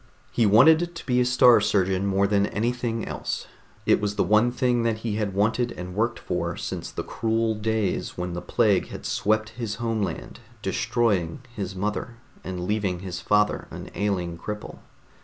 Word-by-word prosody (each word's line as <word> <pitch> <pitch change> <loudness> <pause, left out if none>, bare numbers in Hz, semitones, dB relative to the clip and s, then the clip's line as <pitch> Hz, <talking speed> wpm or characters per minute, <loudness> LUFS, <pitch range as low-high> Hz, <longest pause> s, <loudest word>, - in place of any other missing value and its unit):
He 115 -3 +3
wanted 160 +11 +5
to 165 - -8
be 125 -1 +2
a - - +3
Star 125 -2 +6
Surgeon 95 -2 +1
more 100 0 +2
than 100 0 +2
anything 115 +1 -2
else. - - -4 0.4
It - - +4
was 105 0 -1
the - - +2
one 110 +3 +4
thing 125 -1 +1
that 115 -1 0
he 105 -2 -1
had 100 -3 -2
wanted 110 +4 +1
and 90 0 -7
worked 115 +4 0
for - - -3
since - - -4
the - - -5
cruel 115 0 0
days 110 -2 -1
when 90 0 -3
the 90 - -4
plague - - +2
had - - -9
swept 110 +1 +1
his 110 -2 -4
homeland, 115 -2 -3 0.2
destroying 95 -3 0
his 95 -2 -4
mother 105 +5 -3 0.3
and 90 -1 -4
leaving 100 -3 -1
his 90 -2 -5
father 105 0 +2
an - - -8
ailing 90 -5 -2
cripple. 105 +3 -6
105 Hz, 175 wpm, -25 LUFS, 95-115 Hz, 0.4 s, Star